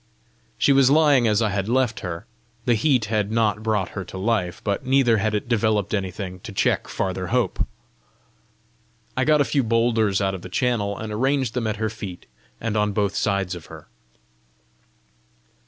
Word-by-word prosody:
She 140 - +4
was 135 -1 +5
lying 145 -5 +5
as 105 +1 +2
I 110 - +1
had 100 +1 -2
left 125 -2 +1
her. 90 +2 -6 0.4
The 120 - +3
heat 120 +1 +2
had 105 -1 -1
not 110 -2 +1
brought 110 -4 0
her 100 - -5
to - - -9
life, 95 -4 -1
but 100 +2 -1
neither 130 -3 +3
had 105 +1 0
it 105 - -2
developed 110 -4 +1
anything 95 -2 -3
to 110 +3 -9
check 95 - +1
farther 95 -1 -3
hope. 120 -6 0 1.5
I 130 - +1
got 150 0 +4
a - - +3
few 140 - +1
boulders 115 -4 +2
out 95 -1 0
of 95 - -6
the 90 - -9
channel, 105 -2 0
and 110 -1 -5
arranged 130 +1 0
them 120 -3 -1
at 110 - -1
her 110 0 -2
feet 100 -5 -8 0.3
and 115 -1 -2
on 105 -1 +1
both 100 -1 0
sides 100 -3 0
of 85 -2 -9
her. - - -12
110 Hz, 180 wpm, -23 LUFS, 100-120 Hz, 1.5 s, was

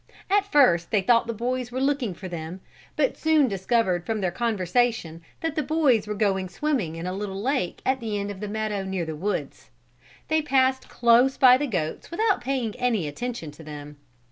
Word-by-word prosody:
At 405 0 +2
first 175 - +4
they 205 -3 +1
thought 230 +3 +3
the - - -1
boys 245 +2 -3
were 255 - -3
looking 270 -8 0
for 185 - -8
them; 170 +1 -6 0.3
but - - +1
soon 315 -3 +3
discovered 190 -3 0
from 220 +3 -2
their 185 -3 0
conversation 220 -4 0 0.2
that 325 -2 -1
the 310 - +1
boys 275 -8 +2
were 210 - -3
going 195 -3 0
swimming 210 - -1
in 165 +1 -6
a 180 - -3
little 195 0 -4
lake 250 -5 -2
at 260 0 +1
the 220 -3 -3
end 200 0 -3
of 195 - -9
the 210 - -4
meadow 210 -1 -2
near 190 -3 -3
the 160 -1 -5
woods. 200 +7 -4 0.6
They 315 0 +2
passed 265 -2 +1
close 240 +3 +4
by 255 -1 +8
the 290 +2 -2
goats 160 - -3
without 400 - +1
paying 250 -4 -2
any 230 -10 0
attention 195 0 -5
to 150 +2 -14
them. 150 -1 -9
220 Hz, 195 wpm, -25 LUFS, 185-260 Hz, 0.6 s, by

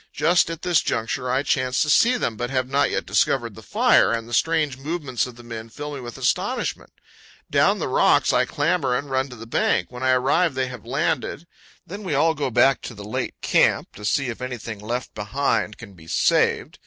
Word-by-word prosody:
Just 170 0 +3
at 165 0 -6
this 175 -3 +3
juncture 125 +3 -2
I 130 +2 +1
chance 130 -2 0
to - - -4
see 250 +9 +4
them, 115 - -2
but 120 +3 -3
have 130 -1 -1
not 140 +2 +2
yet - - -2
discovered - - +1
the - - -12
fire, - - +3
and 115 -1 -2
the 120 - -9
strange 155 0 +1
movements 145 -5 -2
of 125 - -11
the 120 - -13
men 115 -1 -8
fill 145 +5 -7
me 140 - -6
with 120 -1 -8
astonishment. - - -1 0.6
Down - - +3
the - - -3
rocks - - +3
I - - +3
clamber, 145 -4 0
and 140 0 -6
run 130 +1 0
to 125 - -10
the 115 0 -10
bank. 90 -5 0
When 125 0 -9
I 130 - +1
arrive 135 +5 +2
they 130 -1 -1
have 125 -4 -10
landed. 145 +4 -1 0.4
Then 200 +4 -8
we 180 -8 -2
all 160 +3 +3
go 145 -3 -2
back 135 +3 +3
to 120 - -8
the 100 0 -9
late 105 - -4
camp - - +2
to 105 - -11
see 125 +5 0
if 115 - -6
anything 120 -4 -6
left 120 +4 -4
behind 105 0 -1
can 115 -4 -12
be 80 -3 -16
saved. - - +1
130 Hz, 215 wpm, -23 LUFS, 115-145 Hz, 0.6 s, see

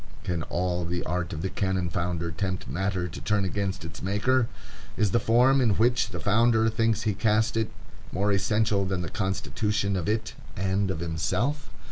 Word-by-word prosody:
Can 85 -2 -1
all 90 +2 -1
the 85 +1 -2
art 90 0 -2
of 80 +1 -4
the 95 - 0
cannon 95 -2 0
founder 85 -1 -2
tempt 95 +3 -3
matter 90 +5 -1
to 80 - -8
turn 105 -2 +1
against 95 -2 -2
its 80 0 -8
maker? 110 +6 +2 0.5
Is 105 -3 +2
the 120 - +3
form 125 +5 +4
in 110 -5 +3
which 120 +1 +2
the 90 -3 -5
founder 110 +3 +3
thinks 110 -1 +1
he 110 - +1
casts 110 +3 +2
it 110 -1 0 0.4
more 100 +3 +1
essential 105 0 +2
than 95 -2 -1
the 80 - -4
constitution 100 +1 -1
of 90 +1 -1
it 110 0 -1 0.2
and 95 +1 0
of 90 -3 -2
himself? 85 - -1
100 Hz, 180 wpm, -27 LUFS, 90-110 Hz, 0.5 s, form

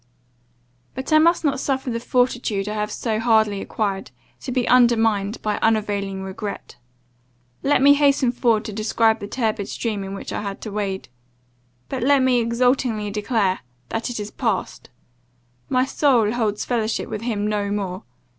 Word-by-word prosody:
"But 265 +4 -3
I 310 - +7
must 335 +1 +3
not 275 -2 +1
suffer 265 -2 -1
the 230 - -2
fortitude 245 -5 0
I 210 - -2
have 210 0 -2
so 220 -1 -2
hardly 220 -3 +2
acquired, 195 -3 -3 0.3
to 260 - -6
be 250 -1 0
undermined 225 -4 +3
by 210 -1 -1
unavailing 205 -3 0
regret. 200 +2 -6 0.8
Let 275 -1 +2
me 285 +1 +8
hasten 280 -3 +3
forward 230 -3 +1
to 215 - -5
describe 220 +1 +2
the 205 - -6
turbid 215 -3 -2
stream 215 -4 -3
in 195 0 -6
which - - -7
I - - -2
had 200 -1 -5
to 215 - -6
wade 200 -5 -3 0.8
but 265 - -4
let 275 +1 +4
me 255 -1 +3
exultingly 235 -2 +1
declare 205 -2 0 0.3
that 225 +2 -2
it 240 - -4
is 210 0 -5
passed 225 -7 -3 0.8
my 255 0 +2
soul 255 -6 +2
holds 220 -3 -1
fellowship 225 -3 -1
with 215 - -5
him 220 -3 -2
no 210 -1 -1
more. 195 -2 -3
220 Hz, 165 wpm, -22 LUFS, 205-250 Hz, 0.8 s, me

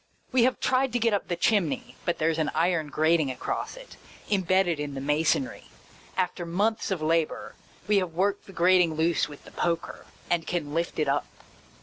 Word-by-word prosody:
We 250 -3 +4
have 255 - +1
tried 260 -1 +1
to 245 - +1
get 230 -1 +2
up 200 - -1
the 175 - -1
chimney, 170 - 0
but 175 - 0
there 165 +1 +2
's 160 - -4
an 155 - +1
iron 165 -1 +1
grating 155 0 +2
across 130 - -4
it, - - -12 0.3
imbedded 185 -4 +2
in 145 -1 -4
the - - -3
masonry. 155 - 0 0.5
After 180 -1 -1
months 205 +7 0
of 185 -5 -2
labour, 165 0 0 0.3
we 210 -1 +4
have 175 -4 -4
worked 200 +3 0
the - - -10
grating 180 -2 +4
loose 160 -2 +1
with 145 - -12
the - - -14
poker, 170 -1 -2 0.2
and 170 -2 0
can 155 -5 -2
lift 170 +1 -1
it 155 - +1
up. 140 +1 0
170 Hz, 195 wpm, -27 LUFS, 155-195 Hz, 0.5 s, We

